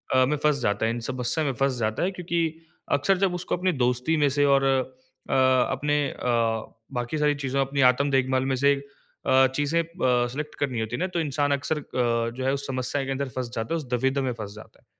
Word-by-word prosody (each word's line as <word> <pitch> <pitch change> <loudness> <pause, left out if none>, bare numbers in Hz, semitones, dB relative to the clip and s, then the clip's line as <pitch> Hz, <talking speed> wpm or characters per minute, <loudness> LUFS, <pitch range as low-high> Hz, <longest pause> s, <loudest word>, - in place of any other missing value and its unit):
अ, 130 0 +5
में 150 +3 0
फँस 150 -2 +3
जाता 105 0 +1
है, 115 - +1
इन 120 - -3
समस्या 130 +5 -1
में 135 - 0
फँस 135 +1 0
जाता 110 +3 -1
है, 185 - +1
क्योंकि 165 -3 -2 0.3
अक्सर 145 +7 +3
जब 185 -1 +1
उसको 180 - -2
अपनी 185 +1 +1
दोस्ती 125 +6 +1
में 145 -1 +3
से 145 +1 +2
और 135 - +2
अ, 130 -1 -2
अपने 130 +3 +2
अ, 115 -2 -1 0.2
बाकी 120 +4 -2
सारी 150 -1 +2
चीज़ो 135 -1 -2
अपनी 135 +1 0
आत्म 140 +3 -1
देखभाल 130 0 +2
में 135 - 0
से 140 +2 +4
अ, 135 -1 0
चीज़ें 150 +4 +1
ब 125 -3 +2
सिलेक्ट 150 +3 -5
करनी 130 -5 -1
होती 110 +2 -2
है - - -5
ना, 185 - 0
तो 180 -2 -3
इंसान 145 -2 0
अक्सर 140 +2 0
अ, 120 -4 0
जो 130 - -3
है 135 - +2
उस 140 0 -3
समस्या 135 +1 -2
के 135 - -3
अंदर 135 0 -2
फँस 125 -1 -4
जाता 115 +8 -2
है, - - +1
उस 155 - -4
दुविधा 130 +3 +1
में 130 - -1
फँस 105 -3 -7
जाता 110 - -14
है। - - -36
135 Hz, 230 wpm, -25 LUFS, 125-145 Hz, 0.3 s, अ